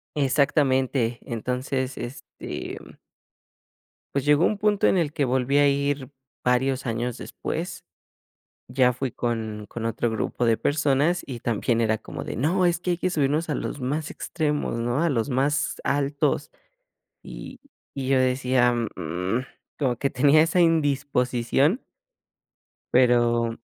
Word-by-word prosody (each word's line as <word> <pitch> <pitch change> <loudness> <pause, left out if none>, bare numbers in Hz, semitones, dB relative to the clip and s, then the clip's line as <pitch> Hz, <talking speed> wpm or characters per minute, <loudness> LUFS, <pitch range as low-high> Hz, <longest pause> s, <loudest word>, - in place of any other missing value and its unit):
Exactamente. 135 -4 +2
Entonces, 125 +3 -3
este 120 +3 -7 1.4
Pues 140 -2 0
llegó 150 +3 +4
un 210 - +1
punto 205 -1 +3
en - - +3
el 150 -4 0
que 145 - 0
volví 130 +2 +1
a 145 - +5
ir 140 -1 -1 0.3
varios 130 +1 +1
años 120 +1 -2
después. - - -5 0.8
Ya 125 0 +3
fui 125 +1 -3
con 110 -3 -3
con 115 - -6
otro 115 +1 -1
grupo 110 +2 -2
de 115 -1 +4
personas 150 +5 +1
y 125 -4 -6
también 115 +1 0
era 110 -1 +1
como - - -7
de: - - -5
"No, 170 - +1
es 175 -1 +2
que 180 +1 -3
hay - - 0
que 185 - 0
subirnos 155 0 0
a - - 0
los 145 - -4
más 145 +4 -2
extremos, 150 -6 -2
¿no? 120 +5 0
A 170 - +2
los 115 -3 0
más 140 +3 0
altos". 140 0 0 0.7
Y - - -9 0.4
y 135 -2 -3
yo 135 -1 +4
decía: 125 -1 +2 0.2
"Mm", 90 +8 -2 0.4
como 130 -5 0
que 140 - 0
tenía 145 +4 +5
esa 170 +2 +2
indisposición 140 - +2 1.1
Pero 120 -2 +3
130 Hz, 140 wpm, -25 LUFS, 120-145 Hz, 1.4 s, a